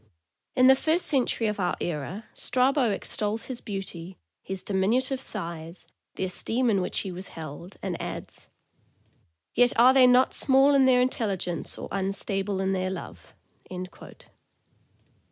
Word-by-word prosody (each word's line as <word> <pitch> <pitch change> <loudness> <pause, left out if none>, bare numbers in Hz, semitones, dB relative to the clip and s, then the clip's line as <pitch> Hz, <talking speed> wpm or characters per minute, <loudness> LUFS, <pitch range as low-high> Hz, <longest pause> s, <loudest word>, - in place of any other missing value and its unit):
In 255 - +5
the 265 +1 +8
first 320 +6 +1
century 250 -4 +1
of 210 -1 -1
our 180 -2 0
era, 175 +6 -4
Strabo 260 -1 +1
extols 210 +2 -2
his 255 -2 -6
beauty, 190 -4 -7 0.2
his 190 -1 -6
diminutive 245 +7 0
size, 170 -6 -6 0.3
the - - -3
esteem 230 +6 0
in 195 -2 +2
which 180 - -1
he 195 - -5
was 185 +2 -6
held, 160 +4 -9
and 180 -3 -3
adds: - - -7 1.0
"Yet 245 0 +4
are 250 +3 +7
they 260 -2 +7
not 250 +1 +4
small 270 +1 +5
in 275 -1 +5
their 250 -1 +5
intelligence 195 - -2
or - - -6
unstable 195 0 -1
in 190 0 0
their 185 0 -1
love." 190 - -9
205 Hz, 140 wpm, -26 LUFS, 185-255 Hz, 1.0 s, the